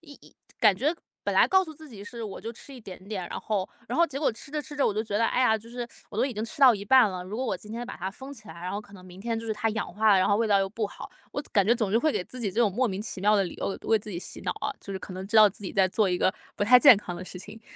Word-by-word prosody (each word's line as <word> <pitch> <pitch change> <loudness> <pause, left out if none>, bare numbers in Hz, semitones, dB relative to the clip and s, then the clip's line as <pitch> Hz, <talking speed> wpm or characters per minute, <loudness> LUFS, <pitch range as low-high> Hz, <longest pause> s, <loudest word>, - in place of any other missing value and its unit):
一 300 -3 -13
一 - - -19 0.3
感 215 -3 +6
觉 285 - +1 0.3
本 - - 0
来 - - +6
告 380 0 +5
诉 320 - -9
自 310 +1 -13
己 210 -6 -10
是， 235 +2 -8
我 205 - -7
就 230 - -6
吃 275 - -14
一 255 - -11
点 190 -4 -10
点。 190 -5 -4
然 - - -5
后 205 -4 -2 0.2
然 - - -2
后 340 - +5
结 275 -3 -6
果 295 - +2
吃 220 +5 -12
着 300 +1 -2
吃 295 - -10
着， 285 - +2
我 - - +1
就 215 - 0
觉 205 -2 -2
得， 230 - +3
哎 250 - 0
呀， 220 -3 +4
就 225 +2 -15
是 240 0 -5 0.2
我 - - -8
都 235 - +2
已 270 - -4
经 215 +1 -3
吃 230 - -10
到 260 -3 +9
一 200 -1 -6
半 255 +1 +6
了， 180 -1 -5
如 195 +4 -6
果 255 - -2
我 195 - -1
今 210 - -13
天 235 +2 -4
把 190 -5 -5
封 265 +7 -10
起 220 -5 -15
来， - - -9
然 180 +1 -4
后 205 - -3
可 205 - -18
能 185 -2 -13
明 185 +1 -12
天 230 +1 -2
就 225 - -7
是 220 - 0
它 215 +1 -1
氧 215 -4 -4
化 215 +2 +3
了， 195 - +5
然 185 - +3
后 205 - +3
味 230 +1 +1
道 200 -1 +4
又 195 - 0
不 215 +2 -3
好。 - - -10 0.2
我 - - -2
感 200 - +4
觉 230 - +5
总 220 -4 -1
是 - - +4
会 310 +6 +2
给 - - -1
自 255 - -10
己 210 -4 -1
这 220 - -1
种 225 -4 +4
莫 250 +5 +1
名 190 -1 -4
其 210 - -6
妙 210 +2 +4
的 200 - +3
理 175 - -6
由， - - -4
为 195 - -3
为 225 - +3
自 210 - -11
己 170 - -4
洗 - - -9
脑 - - -1
啊， - - -2
就 195 - -8
是 190 - -4
可 190 - -8
能 185 +1 -6
知 220 - +1
道 215 -1 +9
自 205 +1 -10
己 - - -5
在 190 -1 +4
做 205 +1 +1
一 180 - +1
个 185 - +2 0.2
不 - - -1
太 250 +4 +8
健 280 -6 +9
康 185 -3 -6
的 180 +1 -7
事 180 - -9
情。 210 +4 -11
215 Hz, 390 characters per minute, -27 LUFS, 195-240 Hz, 0.3 s, 到